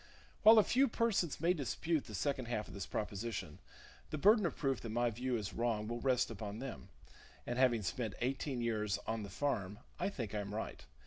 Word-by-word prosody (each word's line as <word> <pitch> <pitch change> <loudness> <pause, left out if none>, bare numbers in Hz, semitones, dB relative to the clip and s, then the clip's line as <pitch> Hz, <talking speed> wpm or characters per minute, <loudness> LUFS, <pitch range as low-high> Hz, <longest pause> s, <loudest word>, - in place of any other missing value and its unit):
While 220 +1 +9
a 215 - +8
few 265 +6 +4
persons 220 -9 +1
may 170 +3 +3
dispute 160 0 -1
the 110 - -6
second 135 +3 -1
half 110 -3 -2
of - - -11
this 100 0 -5
proposition, 105 -5 -4 0.5
the 155 - -3
burden 205 +4 +5
of - - -6
proof 135 -5 0
that 115 - -5
my 120 +2 +1
view 125 +2 -1
is 105 -2 -4
wrong 115 -3 0
will 120 +1 -3
rest 125 -3 +2
upon 105 -1 -5
them; 120 - -7 0.6
and 120 +1 -2
having 120 -4 +4
spent 110 +3 -2
eighteen 130 0 -1
years 105 -4 0
"on 110 0 -2
the 100 - -6
farm," 105 -3 -1 0.2
I - - +1
think 115 - -5
I 105 - -1
am 100 0 -4
right. 110 - -5
120 Hz, 205 wpm, -36 LUFS, 105-140 Hz, 0.6 s, While